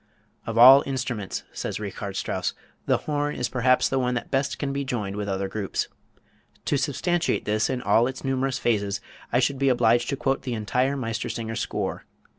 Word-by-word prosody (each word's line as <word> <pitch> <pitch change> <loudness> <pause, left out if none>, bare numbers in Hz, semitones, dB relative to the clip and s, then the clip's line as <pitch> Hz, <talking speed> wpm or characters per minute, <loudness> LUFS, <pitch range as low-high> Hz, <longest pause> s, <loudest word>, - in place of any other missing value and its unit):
"Of 115 0 -3
all 130 +4 +10
instruments," 125 -7 -3
says - - -4
Richard - - -5
Strauss, - - -2 0.3
"the - - +4
horn 145 -1 -1
is 125 - -2
perhaps 130 0 +3
the 135 - 0
one 125 -1 0
that 120 - -4
best 135 +1 0
can 140 -1 -2
be 140 0 -1
joined 105 -7 -3
with 105 -1 -3
other 95 0 -1
groups. 100 0 -3 0.8
To - - +1
substantiate 165 +5 0
this 110 +1 +1
in 125 -1 -2
all 110 +4 +4
its 130 0 -6
numerous 135 -1 0
phases, 100 -4 0 0.3
I - - +3
should 130 +1 +1
be 135 0 +3
obliged 120 -1 +3
to - - 0
quote 135 0 0
the 125 -3 -3
entire 125 +6 0
'Meistersinger' 115 -2 -3
score. - - -3
125 Hz, 185 wpm, -25 LUFS, 115-135 Hz, 0.8 s, all